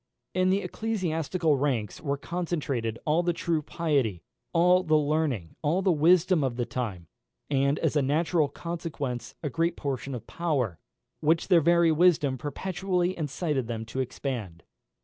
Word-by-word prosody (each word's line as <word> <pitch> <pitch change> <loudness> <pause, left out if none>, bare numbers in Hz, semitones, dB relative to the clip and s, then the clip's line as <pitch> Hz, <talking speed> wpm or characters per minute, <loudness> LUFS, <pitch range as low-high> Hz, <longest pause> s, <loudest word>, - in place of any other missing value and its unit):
In 185 0 +2
the 195 +2 +2
ecclesiastical 175 -6 0
ranks 125 -7 -1
were 140 -2 -1
concentrated 145 -9 -2
all 155 +3 +3
the 175 0 +1
true 165 -2 -1
piety, 140 - -1 0.3
all 180 +2 +5
the 155 -4 +3
learning, 145 - 0
all 165 +5 +1
the 190 - +4
wisdom 170 +1 +4
of 130 -3 -1
the 120 0 -1
time; 105 -10 -4 0.5
and, 140 +1 +2
as 160 -2 0
a 145 - +4
natural 155 +3 +2
consequence, 145 -6 -5
a 150 - -1
great 165 +3 0
portion 135 -2 -3
of 120 - -7
power, 135 - -1 0.4
which 160 +4 +1
their 175 -3 +6
very 170 +1 +4
wisdom 155 -5 +3
perpetually 180 +4 -1
incited 150 -4 -2
them 115 -1 -4
to 115 +4 -5
extend. 120 -9 -4
155 Hz, 150 wpm, -27 LUFS, 130-175 Hz, 0.5 s, their